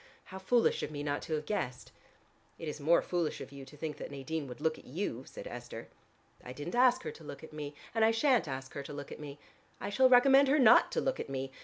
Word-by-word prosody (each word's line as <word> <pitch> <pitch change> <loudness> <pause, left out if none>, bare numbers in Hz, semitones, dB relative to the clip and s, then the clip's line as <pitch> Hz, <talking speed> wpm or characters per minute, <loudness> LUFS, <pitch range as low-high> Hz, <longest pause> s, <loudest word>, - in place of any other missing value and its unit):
How 190 - -9
foolish 235 +5 +2
of - - -3
me 145 -1 -5
not 145 0 -1
to 160 - -5
have 150 0 -4
guessed." 125 -12 -3 0.7
"It 165 - -7
is 150 - -5
more 160 +4 +4
foolish 175 -3 -1
of - - -8
you 140 -1 -9
to 150 +3 -14
think 150 -1 -4
that - - -7
Nadine 140 +2 -4
would 125 - -9
look 160 +1 0
at - - -17
you," 135 - -4
said - - -9
Esther. 120 -1 -8 0.5
"I 125 - -8
didn't 145 +6 -6
ask 255 +1 +4
her - - -4
to 165 - -14
look 140 -1 -9
at 160 - -11
me, 145 -1 -6 0.2
and 225 -1 +2
I 220 - +6
shan't 240 - +3
ask 130 -1 -6
her 140 - -4
to 140 - -8
look 145 -1 -7
at - - -8
me. 145 -1 -8 0.4
I 205 - -4
shall 260 +5 +5
recommend 270 +2 +7
her 280 +3 +4
not 245 -4 +6
to - - +1
look 265 0 -1
at - - -5
me. 135 0 -4
155 Hz, 260 wpm, -32 LUFS, 140-220 Hz, 0.7 s, recommend